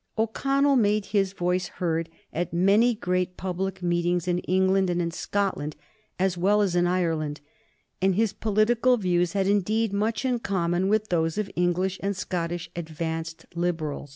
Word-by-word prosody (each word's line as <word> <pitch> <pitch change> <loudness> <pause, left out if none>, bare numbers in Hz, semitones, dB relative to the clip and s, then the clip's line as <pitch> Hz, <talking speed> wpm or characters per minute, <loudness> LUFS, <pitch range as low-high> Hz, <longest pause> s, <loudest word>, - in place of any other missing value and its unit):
O'Connell 275 +5 +2
made 210 -2 +2
his 200 -2 +1
voice 180 -1 -1
heard 165 -2 -2 0.2
at 175 +2 -2
many 200 +8 +4
great 180 -3 -1
public 190 0 -3
meetings 175 0 0
in 175 0 +1
England 190 +1 +2
and 175 0 0
in 170 -1 -1
Scotland, 185 -5 -2 0.4
as 185 -1 0
well 205 +3 +3
as 185 -3 0
in 175 0 +3
Ireland, 165 -5 -1 0.6
and 190 -1 +3
his 215 0 +1
political 230 +4 +2
views 175 -3 +1
had, 195 -1 +1
indeed, 205 +2 +1
much 220 +4 0
in 250 -2 +1
common 180 -3 0
with 215 0 +1
those 165 -1 0
of 205 -2 -2
English 180 +2 0
and 200 -1 -2
Scottish 175 -1 -3
advanced 165 0 -4
Liberals. 165 -4 -2
185 Hz, 155 wpm, -26 LUFS, 175-205 Hz, 0.6 s, many